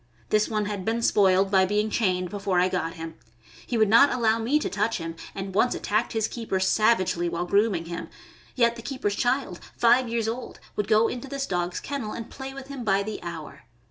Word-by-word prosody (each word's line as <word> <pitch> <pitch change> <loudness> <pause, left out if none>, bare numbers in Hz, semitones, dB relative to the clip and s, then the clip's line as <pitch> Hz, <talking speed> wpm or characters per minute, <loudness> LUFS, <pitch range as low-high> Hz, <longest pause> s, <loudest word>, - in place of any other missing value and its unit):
This 215 0 +2
one 215 -2 0
had 205 -2 -4
been 230 +3 -1
spoiled 195 -2 +4
by 190 -1 +5
being 210 +2 0
chained 185 -5 0
before 200 -3 0
I 180 +1 +3
got 165 -3 -2
him. 165 -1 -7 0.5
He 240 - -1
would 220 -1 +4
not 230 +7 +6
allow 230 -2 +2
me 240 +7 +2
to 305 - -1
touch 210 +3 0
him, 165 -1 -5 0.2
and 195 -1 -5
once 240 +5 +2
attacked 215 +4 -1
his 220 -1 +1
keeper 225 -6 -3
savagely 185 -3 +2
while 170 +1 -2
grooming 200 -2 +1
him; 170 0 -6 0.5
yet 235 -1 +3
the - - -7
keeper's 240 -5 -2
child, 245 -7 0 0.2
five 240 +1 +4
years 230 -1 -1
old, 235 +2 -5 0.2
would 210 - -1
go 220 +1 +4
into 250 +2 -5
this 275 0 -3
dog's 180 -5 -2
kennel 270 -7 -4
and 230 - -7
play 265 0 -7
with 270 0 -9
him 275 -3 -6
by 200 -2 +2
the 215 +1 -5
hour. 160 -4 -8
215 Hz, 210 wpm, -26 LUFS, 185-235 Hz, 0.5 s, not